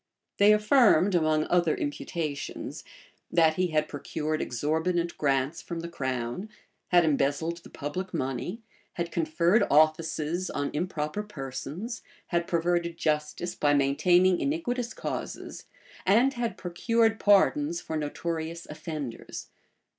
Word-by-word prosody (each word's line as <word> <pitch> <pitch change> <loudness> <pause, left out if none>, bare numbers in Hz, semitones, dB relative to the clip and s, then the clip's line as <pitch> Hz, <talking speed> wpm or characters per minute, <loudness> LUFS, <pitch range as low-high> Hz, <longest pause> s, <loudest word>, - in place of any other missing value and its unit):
They 205 +1 +7
affirmed, 210 - +5
among 155 -2 +2
other 175 -3 +2
imputations, 145 0 -4 0.5
that 160 -2 +4
he 185 +3 +1
had 155 -2 +1
procured 155 +1 -3
exorbitant 160 +7 -1
grants 140 +2 0
from 170 -1 -5
the 170 - -5
crown, 130 - -3 0.4
had 175 -2 +5
embezzled 150 +3 +1
the 170 - -14
public 180 +6 -5
money, 135 - -3 0.3
had 170 -1 -3
conferred 170 +5 +2
offices 155 +3 +2
on 145 0 -2
improper 155 +2 -2
persons, 165 - -6 0.3
had 170 -1 0
perverted 170 0 0
justice 155 +3 -1
by 145 -1 +2
maintaining 175 +6 +4
iniquitous 250 -6 -2
causes, - - -5 0.4
and 235 +8 +4
had 240 -2 -3
procured 225 +5 +1
pardons 290 - +3
for 160 - -5
notorious 160 +2 -3
offenders. 150 -5 -6
170 Hz, 115 wpm, -28 LUFS, 150-185 Hz, 0.5 s, They